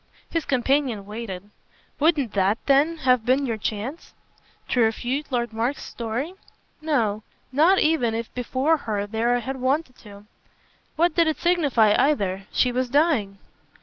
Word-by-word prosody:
His 330 Hz, -3 st, -1 dB
companion 260 Hz, -4 st, 0 dB
waited. 205 Hz, -2 st, -7 dB, 0.5 s
"Wouldn't 295 Hz, -7 st, +2 dB
THAT 200 Hz, +2 st, +2 dB
then 290 Hz, +4 st, +3 dB
have 250 Hz, -3 st, +4 dB
been 260 Hz, +4 st, +2 dB
your 230 Hz, -3 st, -1 dB
chance?" 220 Hz, +9 st, -5 dB, 0.5 s
"To 250 Hz, -, 0 dB
refute 245 Hz, +6 st, -1 dB
Lord 240 Hz, -2 st, -1 dB
Mark's 235 Hz, +6 st, -2 dB
story? 240 Hz, +8 st, -4 dB, 0.5 s
No, 230 Hz, -10 st, 0 dB, 0.3 s
not 320 Hz, +8 st, +4 dB
even 305 Hz, -10 st, +2 dB
if 230 Hz, 0 st, -5 dB
before 260 Hz, +6 st, +1 dB
her 210 Hz, -7 st, -3 dB
there 225 Hz, +3 st, 0 dB
I 245 Hz, -, -1 dB
had 265 Hz, +2 st, -5 dB
wanted 265 Hz, +1 st, -1 dB
to. 205 Hz, -1 st, -14 dB, 0.7 s
What 340 Hz, +1 st, +2 dB
did 335 Hz, 0 st, +3 dB
it 315 Hz, -, 0 dB
signify 285 Hz, -12 st, +3 dB
either? 200 Hz, -9 st, +1 dB
She 250 Hz, -, +2 dB
was 250 Hz, 0 st, -1 dB
dying." 265 Hz, -9 st, +1 dB
250 Hz, 150 wpm, -24 LUFS, 220-295 Hz, 0.7 s, have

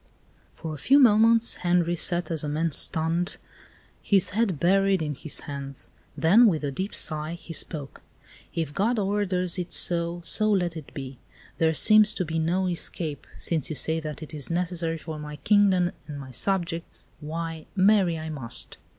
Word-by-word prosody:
For 160 Hz, -1 st, -7 dB
a 150 Hz, -, -8 dB
few 275 Hz, -, +4 dB
moments 230 Hz, -2 st, +4 dB
Henri 175 Hz, -1 st, +1 dB
sat 175 Hz, +1 st, +1 dB
as 160 Hz, -2 st, 0 dB
a 150 Hz, -, -3 dB
man 160 Hz, +2 st, -1 dB
stunned, 165 Hz, +5 st, 0 dB, 0.6 s
his 195 Hz, -3 st, +2 dB
head 200 Hz, -7 st, 0 dB
buried 195 Hz, +3 st, +3 dB
in 150 Hz, -2 st, -3 dB
his 145 Hz, +2 st, -2 dB
hands; 140 Hz, -1 st, -7 dB, 0.3 s
then, 205 Hz, +9 st, +5 dB
with 160 Hz, -7 st, 0 dB
a 140 Hz, -, -2 dB
deep 190 Hz, +8 st, -4 dB
sigh, 155 Hz, 0 st, -2 dB
he 170 Hz, -1 st, -10 dB
spoke: 150 Hz, -4 st, -5 dB, 0.5 s
"If 160 Hz, -4 st, -3 dB
God 225 Hz, +7 st, 0 dB
orders 190 Hz, -3 st, 0 dB
it 180 Hz, -, -5 dB
so, 170 Hz, 0 st, +3 dB
so 215 Hz, +5 st, +2 dB
let 175 Hz, -4 st, 0 dB
it 155 Hz, -4 st, -9 dB
be. 135 Hz, -2 st, -7 dB, 0.4 s
There 160 Hz, -1 st, +2 dB
seems 215 Hz, +4 st, +6 dB
to 185 Hz, -, -2 dB
be 160 Hz, 0 st, -2 dB
no 175 Hz, +4 st, 0 dB
escape; 170 Hz, -3 st, -3 dB
since 160 Hz, -5 st, -2 dB
you 155 Hz, -, -4 dB
say 160 Hz, +2 st, -1 dB
that 155 Hz, -1 st, -7 dB
it 155 Hz, -, -10 dB
is 145 Hz, -3 st, -3 dB
necessary 170 Hz, -1 st, -2 dB
for 160 Hz, -1 st, -7 dB
my 150 Hz, 0 st, -7 dB
kingdom 185 Hz, +2 st, +3 dB, 0.2 s
and 145 Hz, -2 st, -7 dB
my 130 Hz, -2 st, -9 dB
subjects, 170 Hz, -, -2 dB
why, 160 Hz, +1 st, -6 dB
marry 190 Hz, -3 st, +3 dB
I 160 Hz, 0 st, -6 dB
must." 130 Hz, -6 st, -2 dB
170 Hz, 175 wpm, -25 LUFS, 155-190 Hz, 0.6 s, seems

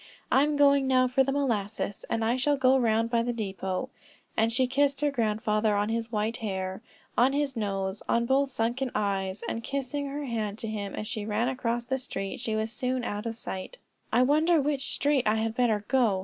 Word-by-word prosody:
I'm 290 Hz, +2 st, +4 dB
going 280 Hz, -1 st, +5 dB
now 255 Hz, -1 st, +4 dB
for 255 Hz, +2 st, +3 dB
the 275 Hz, -, -1 dB
molasses, 220 Hz, -7 st, -1 dB
and 225 Hz, -1 st, 0 dB
I 235 Hz, +2 st, +2 dB
shall 285 Hz, +3 st, +1 dB
go 260 Hz, 0 st, +4 dB
around 230 Hz, -2 st, +2 dB
by 235 Hz, -1 st, +3 dB
the 240 Hz, +1 st, -1 dB
depot;" 190 Hz, -4 st, -3 dB, 0.4 s
and 225 Hz, +1 st, +2 dB
she 255 Hz, +3 st, +3 dB
kissed 280 Hz, +2 st, +1 dB
her 295 Hz, -1 st, +2 dB
grandfather 215 Hz, -3 st, +1 dB
on 205 Hz, +1 st, +1 dB
his 230 Hz, 0 st, -2 dB
white 220 Hz, +1 st, -1 dB
hair, 190 Hz, -2 st, -3 dB, 0.3 s
on 255 Hz, +3 st, +4 dB
his 285 Hz, -2 st, 0 dB
nose, 195 Hz, -2 st, -2 dB
on 235 Hz, 0 st, +2 dB
both 270 Hz, +2 st, +2 dB
sunken 250 Hz, +2 st, -1 dB
eyes, 195 Hz, -1 st, -1 dB
and 230 Hz, -, -3 dB
kissing 280 Hz, +2 st, -3 dB
her 285 Hz, +1 st, -4 dB
hand 215 Hz, -4 st, -2 dB
to 225 Hz, -, -5 dB
him 205 Hz, -3 st, -4 dB
as -, -, -4 dB
she 215 Hz, -2 st, -3 dB
ran 220 Hz, +3 st, 0 dB
across 240 Hz, -2 st, -2 dB
the 265 Hz, +1 st, -1 dB
street, 195 Hz, -6 st, -5 dB
she 220 Hz, -, -2 dB
was 220 Hz, +1 st, -1 dB
soon 255 Hz, +1 st, -2 dB
out 210 Hz, 0 st, -3 dB
of 230 Hz, -, -3 dB
sight. 190 Hz, -, -6 dB, 0.3 s
"I 245 Hz, +2 st, +4 dB
wonder 310 Hz, +5 st, +4 dB
which 280 Hz, -1 st, 0 dB
street 285 Hz, -5 st, +1 dB
I 220 Hz, +1 st, +2 dB
would 225 Hz, 0 st, -1 dB
better 225 Hz, -4 st, +1 dB
go?" 235 Hz, -8 st, +3 dB
230 Hz, 205 wpm, -28 LUFS, 215-265 Hz, 0.4 s, going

